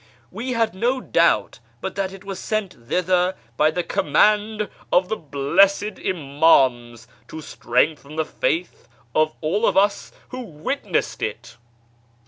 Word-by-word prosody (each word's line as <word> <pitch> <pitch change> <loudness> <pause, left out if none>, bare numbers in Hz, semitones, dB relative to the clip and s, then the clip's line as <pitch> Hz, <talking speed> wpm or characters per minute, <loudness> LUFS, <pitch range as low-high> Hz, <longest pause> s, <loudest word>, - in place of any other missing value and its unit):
We 255 +2 -4
had 225 -2 +1
no 240 +7 0
doubt - - +1 0.2
but - - -4
that 195 -1 -2
it 195 0 -12
was 195 -1 -6
sent 195 - -4
thither 180 +2 +1 0.2
by 150 +4 +4
the 175 +3 -2
command 210 +8 +2 0.2
of 180 +1 +3
the 220 - 0
blessed 190 +7 +1
Imams 135 -7 +2 0.2
to 160 - -8
strengthen 145 +1 -1
the 160 0 0
faith 170 +3 -2 0.3
of 155 0 +2
all 185 +8 +1
of - - +1
us 200 +1 +2 0.2
who 255 - -6
witnessed 190 - -3
it." 115 +2 -5
180 Hz, 135 wpm, -22 LUFS, 150-205 Hz, 0.3 s, by